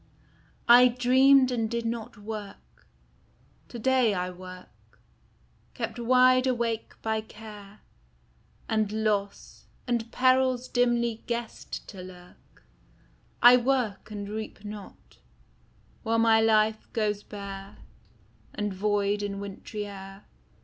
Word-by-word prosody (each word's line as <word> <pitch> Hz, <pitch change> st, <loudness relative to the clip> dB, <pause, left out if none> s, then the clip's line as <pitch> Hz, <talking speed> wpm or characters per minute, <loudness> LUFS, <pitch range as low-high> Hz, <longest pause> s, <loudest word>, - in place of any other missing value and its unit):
I 245 Hz, +1 st, +8 dB
dreamed 255 Hz, +2 st, +4 dB
and 225 Hz, -3 st, -1 dB
did 235 Hz, 0 st, -3 dB
not 230 Hz, -2 st, -4 dB
work: 205 Hz, -1 st, -9 dB, 0.8 s
to 240 Hz, -, -9 dB
day 250 Hz, -3 st, +2 dB
I 180 Hz, 0 st, -2 dB
work, 185 Hz, 0 st, -13 dB, 0.8 s
Kept 230 Hz, -1 st, -4 dB
wide 255 Hz, +2 st, +4 dB
awake 235 Hz, -3 st, -2 dB
by 220 Hz, -1 st, 0 dB
care 210 Hz, -2 st, -13 dB, 0.9 s
And 215 Hz, -2 st, 0 dB
loss, 210 Hz, -2 st, -2 dB, 0.2 s
and 235 Hz, -2 st, -2 dB
perils 255 Hz, -1 st, +2 dB
dimly 235 Hz, -2 st, +1 dB
guessed 235 Hz, -1 st, -5 dB
to 190 Hz, -3 st, -9 dB
lurk: 180 Hz, -1 st, -15 dB, 0.8 s
I 245 Hz, +1 st, +9 dB
work 245 Hz, -5 st, -1 dB
and 205 Hz, -1 st, -6 dB
reap 215 Hz, 0 st, -7 dB
not, 205 Hz, -1 st, -11 dB, 0.8 s
while 230 Hz, -1 st, 0 dB
my 225 Hz, -1 st, +4 dB
life 215 Hz, 0 st, +2 dB
goes 210 Hz, -3 st, -1 dB
bare 200 Hz, -1 st, -9 dB, 0.8 s
And 210 Hz, -1 st, -2 dB
void 205 Hz, +1 st, 0 dB
in 200 Hz, -1 st, -4 dB
wintry 200 Hz, +1 st, -6 dB
air. 195 Hz, 0 st, -10 dB
220 Hz, 110 wpm, -27 LUFS, 205-240 Hz, 0.9 s, I